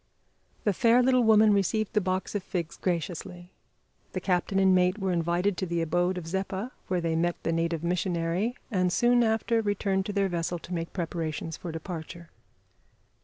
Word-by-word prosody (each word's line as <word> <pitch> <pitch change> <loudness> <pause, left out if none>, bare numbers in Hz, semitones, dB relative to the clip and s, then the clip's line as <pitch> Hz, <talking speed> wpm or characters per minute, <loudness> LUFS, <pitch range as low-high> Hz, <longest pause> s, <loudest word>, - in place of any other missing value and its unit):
The 205 - +2
fair 235 +6 +4
little 255 -1 +4
woman 220 -1 +6
received 200 +2 0
the 210 - +3
box 185 0 -2
of 205 - -1
figs 175 -3 -4
graciously; 175 +1 -4 0.6
the - - -1
captain 185 +1 0
and 190 -1 +5
mate 180 +1 +3
were 195 -3 -1
invited 175 +3 0
to 185 - -2
the 170 0 -1
abode 175 +3 +1
of 175 - -5
Zeppa, 190 +6 -3 0.2
where 180 -2 0
they 165 -1 0
met 170 +1 +1
the 165 - 0
native 165 0 -1
missionary, 175 +5 0 0.2
and 185 -3 +1
soon 240 +3 +4
after 225 +1 +1
returned 200 -2 0
to - - -2
their 200 -1 +2
vessel 175 -1 -2
to 175 +2 -9
make 165 -1 -3
preparations 165 -2 -3
for 170 - -6
departure. 165 0 -7
180 Hz, 175 wpm, -28 LUFS, 170-205 Hz, 0.6 s, woman